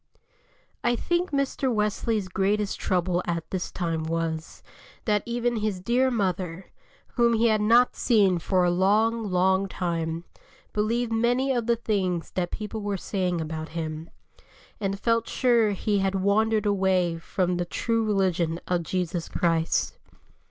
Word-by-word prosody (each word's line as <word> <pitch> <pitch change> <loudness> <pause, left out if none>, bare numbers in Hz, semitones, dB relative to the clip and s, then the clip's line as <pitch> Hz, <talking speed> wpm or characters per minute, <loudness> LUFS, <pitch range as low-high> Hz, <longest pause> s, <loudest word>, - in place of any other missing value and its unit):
I 240 0 +2
THINK 345 +8 0
Mr. 275 -2 0
Wesley's 210 -1 0
greatest 200 +2 0
trouble 180 -1 0
at 170 -1 -2
this 185 -1 -3
time 165 -3 -2
was, 165 0 -3 0.4
that 210 -2 +2
even 240 0 0
his 210 -3 -1
dear 245 +7 +2
mother, 185 -5 -2 0.5
whom 235 -1 +4
he 230 +1 +3
had 215 -1 +2
not 235 +4 +4
seen 200 -7 +3
for 185 +2 +1
a 175 - +3
long, 215 +6 +2
long 190 +1 +2
time, 165 -3 -3 0.5
believed 230 +2 0
many 245 +4 +2
of 240 -2 -1
the 235 - +4
things 190 -7 -1
that 175 -2 -2
people 215 0 -5
were 205 -1 -2
saying 180 -2 -1
about 160 0 -4
him, 160 0 -4 0.7
and 195 -1 -2
felt 230 0 +1
sure 235 -4 +3
he 205 +1 0
had 195 0 0
wandered 215 +3 +2
away 190 -4 +1
from 180 +1 -1
the 175 - -1
true 230 +5 -1
religion 180 -5 0
of 180 -1 +1
Jesus 175 0 -3
Christ. 165 -1 0
195 Hz, 145 wpm, -26 LUFS, 175-225 Hz, 0.7 s, whom